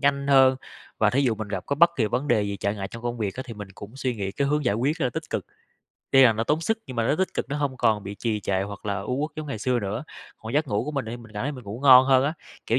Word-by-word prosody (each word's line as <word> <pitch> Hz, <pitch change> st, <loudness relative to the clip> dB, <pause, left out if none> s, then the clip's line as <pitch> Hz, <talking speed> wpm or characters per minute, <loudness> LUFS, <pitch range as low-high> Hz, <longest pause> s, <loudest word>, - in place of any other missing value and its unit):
nhanh 140 Hz, -1 st, +1 dB
hơn, 130 Hz, -1 st, +6 dB, 0.4 s
và 105 Hz, -1 st, +4 dB
thí 135 Hz, -, +2 dB
dụ 120 Hz, -4 st, +2 dB
mình 110 Hz, -1 st, -6 dB
gặp 95 Hz, -2 st, -4 dB
có 140 Hz, -, -1 dB
bất 170 Hz, +2 st, +6 dB
kỳ 115 Hz, -6 st, +2 dB
vấn 125 Hz, +7 st, -2 dB
đề 115 Hz, -5 st, +3 dB
gì 100 Hz, -1 st, -3 dB
trở 100 Hz, +1 st, -1 dB
ngại 100 Hz, -2 st, -5 dB
trong 115 Hz, 0 st, -10 dB
công 120 Hz, 0 st, -3 dB
việc 100 Hz, -3 st, -2 dB
á 130 Hz, -, -5 dB
thì 115 Hz, -, -7 dB
mình 105 Hz, -2 st, -8 dB
cũng 110 Hz, +7 st, -11 dB
suy 130 Hz, -2 st, -2 dB
nghĩ 95 Hz, -1 st, -3 dB
cái 140 Hz, -, 0 dB
hướng 150 Hz, 0 st, 0 dB
giải 120 Hz, -4 st, +2 dB
quyết, 140 Hz, +9 st, 0 dB
ờ, 130 Hz, -6 st, 0 dB
tích -, -, -6 dB
cực. -, -, -3 dB, 0.6 s
Tuy 135 Hz, -, +7 dB
là 120 Hz, -3 st, +7 dB
nó 110 Hz, +1 st, -2 dB
tốn 150 Hz, +6 st, +1 dB
sức 220 Hz, +7 st, 0 dB
nhưng 130 Hz, -3 st, -8 dB
mà 115 Hz, -1 st, +1 dB
nó -, -, +3 dB
tích 190 Hz, -, -1 dB
cực, -, -, -2 dB
nó 145 Hz, -, -2 dB
hông 140 Hz, -3 st, -2 dB
còn 110 Hz, -4 st, +2 dB
bị 100 Hz, +1 st, -6 dB
trì 110 Hz, 0 st, -2 dB
trệ 95 Hz, -1 st, 0 dB
hoặc 100 Hz, +1 st, -7 dB
là 100 Hz, 0 st, -1 dB
u 125 Hz, +6 st, -3 dB
uất 155 Hz, -, -2 dB
giống 155 Hz, -1 st, -5 dB
ngày 125 Hz, -7 st, -4 dB
xưa 125 Hz, +2 st, 0 dB
nữa. 105 Hz, +6 st, -4 dB, 0.3 s
Còn 110 Hz, +1 st, -8 dB
giấc 150 Hz, +1 st, +1 dB
ngủ 105 Hz, -1 st, 0 dB
của 150 Hz, -, -3 dB
mình 140 Hz, -4 st, -2 dB
thì 115 Hz, +2 st, -5 dB
mình 115 Hz, -3 st, -14 dB
cảm 105 Hz, -, -4 dB
thấy 145 Hz, +4 st, -2 dB
mình 130 Hz, -4 st, -10 dB
ngủ 105 Hz, +4 st, -7 dB
ngon 130 Hz, -2 st, +8 dB
hơn 135 Hz, -1 st, +4 dB
á, 145 Hz, -, 0 dB, 0.3 s
kiểu 120 Hz, -, +2 dB
120 Hz, 330 wpm, -25 LUFS, 105-140 Hz, 0.6 s, ngon